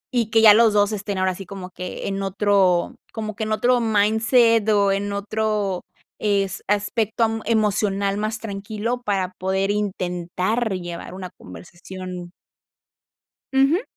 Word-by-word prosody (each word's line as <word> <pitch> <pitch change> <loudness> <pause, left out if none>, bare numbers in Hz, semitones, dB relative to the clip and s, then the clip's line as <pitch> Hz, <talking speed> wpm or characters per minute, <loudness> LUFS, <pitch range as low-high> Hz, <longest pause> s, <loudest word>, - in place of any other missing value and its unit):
y 235 -3 +2
que 225 0 +3
ya 215 -2 +10
los 225 0 +5
2 205 0 +3
estén, 205 -1 -3
ahora 185 0 +1
así, 190 +1 -8
como 190 -2 -8
que 180 0 -6
en 195 0 -2
otro 195 -2 +2 0.2
como 215 -2 -5
que 220 - -3
en 215 - -4
otro 245 +3 +3
mindset, 225 +1 +3
o, 200 -2 +3
en 200 +1 -1
otro 200 -2 -1 0.4
es 200 -2 0
aspecto 210 +2 0
am 225 0 0
emocional 205 -2 +1
más 215 +1 -2
tranquilo 215 +3 -4
para 195 -5 -1
poder 190 +1 0
intentar 190 +2 -1
llevar 175 -1 -5
una 185 -1 -7
conversación. 175 - -9 1.2
Ujú. 275 - +3
205 Hz, 140 wpm, -22 LUFS, 190-220 Hz, 1.2 s, ya